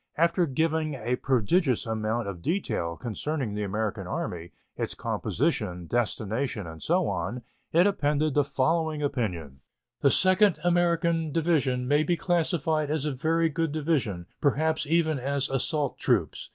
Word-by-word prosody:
After 170 +2 +3
giving 155 +1 0
a 125 0 -2
prodigious 130 - +1
amount 110 0 -1
of 90 -4 -6
detail 85 - -2
concerning 130 0 -3
the 105 - -3
American 105 -1 -2
Army, 85 -1 -4 0.2
its - - -3
composition, 90 -1 -1
destination, 110 +1 -1
and 80 -1 -9
so 175 +1 +1
on, 125 0 -3 0.3
it 170 +3 +5
appended 150 -6 +1
the 145 - +3
following 150 +3 0
opinion: 90 - -3 0.4
"The 140 - +5
2d 185 +3 +4
American 170 -2 +2
Division 140 -6 +1
may 145 +2 +4
be 175 +3 +1
classified 160 -4 0
as 155 -1 -1
a 150 - 0
very 165 +4 +1
good 165 0 -1
division, 140 - -1 0.2
perhaps 155 +2 +1
even 160 -2 +2
as 140 +1 -1
assault 140 +2 -1
troops. - - 0
145 Hz, 140 wpm, -27 LUFS, 115-165 Hz, 0.4 s, it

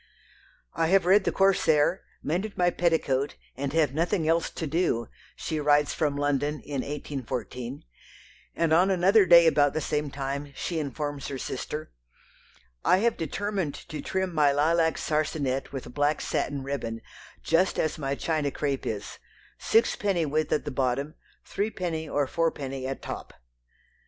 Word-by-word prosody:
"I 165 - +1
have 190 +1 +4
read 190 +2 +5
the - - +2
'Corsair,' 185 -3 +3 0.2
mended 190 +7 -2
my 175 0 +3
petticoat, 145 -6 +1 0.2
and 140 0 -3
have 155 -4 +2
nothing 165 +2 0
else 165 +1 +2
to 160 - -5
do," 145 -7 0 0.3
she 160 -2 -3
writes 145 0 +3
from 145 -3 0
London 145 +1 0
in 140 -3 -3
1814, 130 -3 -5 0.7
and 165 -1 +2
on 180 +4 +5
another 190 +2 +4
day 170 -1 +8
about 145 -3 +4
the 155 - 0
same 150 -1 -1
time 140 +1 -4
she 165 +3 -2
informs 145 0 -4
her 135 - -4
sister: 150 +4 -5 0.9
"I - - +5
have 230 +3 +2
determined 190 0 -2
to 155 -2 -5
trim 190 -1 -2
my 150 -3 +4
lilac 160 +3 +2
sarsenet 150 -3 -1
with 130 -3 -7
black 145 +1 +1
satin 140 -2 -2
ribbon, 115 -5 -4 0.4
just 175 +3 +2
as 155 0 -1
my 135 -1 -1
China 155 -1 -1
crape 140 -1 -2
is, 105 -2 -5 0.4
six 225 - +3
penny 190 -5 0
width 155 +1 -1
at - - +1
the 145 - -3
bottom, 135 +3 -1 0.3
threepenny 175 -6 -3
or 145 0 +1
four 165 +5 +1
penny 135 -3 -5
at 135 - -5
top." - - -7
150 Hz, 155 wpm, -27 LUFS, 140-170 Hz, 0.9 s, day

